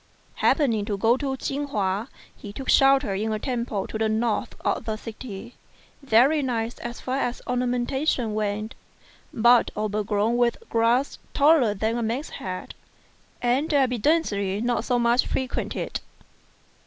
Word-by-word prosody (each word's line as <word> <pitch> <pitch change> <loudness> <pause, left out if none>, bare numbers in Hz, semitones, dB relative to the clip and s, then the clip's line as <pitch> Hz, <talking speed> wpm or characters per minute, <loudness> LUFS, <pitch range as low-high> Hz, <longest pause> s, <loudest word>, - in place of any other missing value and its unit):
Happening 235 -9 +2
to 205 -1 -2
go 225 +4 +3
to 270 -1 -2
Chin 285 +2 -3
hua, 205 -4 -1 0.3
he 205 - -9
took 265 +6 -7
shelter 270 -5 +5
in 215 +3 -1
a 215 - 0
temple 235 -4 -2
to 220 - -5
the 220 0 +1
north 220 +1 -1
of - - -1
the 220 - -2
city; 225 0 -8 0.5
very 275 +4 +4
nice 235 -3 -2
as 240 0 -6
far 260 +1 -2
as 245 -2 -2
ornamentation 250 0 0
went, 215 +1 -2 0.6
but 240 +1 +4
overgrown 210 +2 0
with 240 -1 +2
grass 235 +4 +2 0.2
taller 285 -7 +4
than 220 +4 -1
a - - -2
man's 235 +7 -2
head, 185 -1 -6 0.7
and 260 +7 +1
evidently 245 - +1
not 240 +2 -1
much 240 0 +3
frequented. 260 -1 -3
235 Hz, 140 wpm, -25 LUFS, 215-260 Hz, 0.7 s, shelter